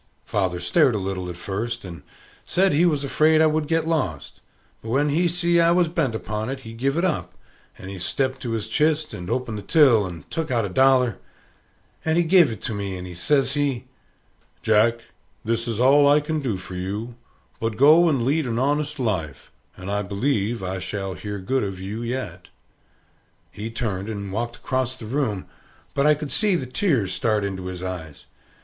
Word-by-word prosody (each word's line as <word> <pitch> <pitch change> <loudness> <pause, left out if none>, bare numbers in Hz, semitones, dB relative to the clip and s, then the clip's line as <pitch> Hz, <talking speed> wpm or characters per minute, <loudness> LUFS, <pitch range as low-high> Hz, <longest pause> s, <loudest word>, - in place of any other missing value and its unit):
Father 95 -4 -1
stared 130 - +3
a - - +1
little 95 -2 -3
at 85 - -7
first, 110 +5 -4
and 85 -2 -8 0.4
said 190 +2 +2
he 165 +5 +4
was 150 -4 0
afraid 155 +3 +3
I 160 - +6
would 155 -1 +1
get 165 0 0
lost; 165 -2 -2 0.4
but 110 - -8
when 140 +5 +2
he 170 +5 +2
see 170 0 +2
I 170 0 +5
was 175 -1 +3
bent 150 -9 0
upon 105 +2 -3
it, 135 0 -4
he 115 -2 -9
give 135 +6 -1
it 170 - +2
up, 175 -5 -2 0.4
and 95 - -10
he 95 -1 -7
stepped 130 +8 -1
to 120 -2 -3
his 110 -2 -2
chist, 155 0 +1
and 90 +1 -7
opened 115 -4 -2
the - - -7
till, 115 - +4
and 85 -5 -9
took 160 -1 -2
out 120 -4 +1
a - - -4
dollar, 125 -1 +3 0.8
and 160 +1 +1
he 175 - +4
gave 170 -5 +5
it 110 - -8
to 115 - -2
me; 100 -2 -4
and 90 -1 -8
says 135 - +2
he, 140 -5 -1 0.8
"Jack, 110 +2 +3 0.4
this 115 +1 -1
is 115 -2 -2
all 140 +3 +6
I 145 +1 +6
can 155 +1 -2
do 125 -9 -2
for 95 0 -9
you; 100 +6 -4 0.5
but 115 -1 -2
go 155 +6 +6
and 135 -6 +1
lead 145 +1 +1
an 115 -1 -2
honest 145 +3 0
life, 90 - -3 0.3
and 95 +2 -6
I 100 0 0
believe 105 +1 -1
I 95 +1 -3
shall 95 +1 -4
hear 105 +2 -6
good 125 +7 -1
of 95 -2 -4
you 100 +5 -5
yet." 115 -8 -5 1.0
He 110 +2 -6
turned 110 -4 -3
and 100 -3 -5
walked 120 +2 -2
across 130 0 -2
the 115 - -9
room, 110 -5 -1 0.5
but 140 +1 +2
I 150 - +6
could 150 -1 -6
see 210 -4 +3
the 150 - -2
tears 125 - 0
start 110 -3 0
into 95 -2 -4
his 90 -1 -6
eyes. 85 -5 -6
120 Hz, 200 wpm, -23 LUFS, 100-145 Hz, 1.0 s, I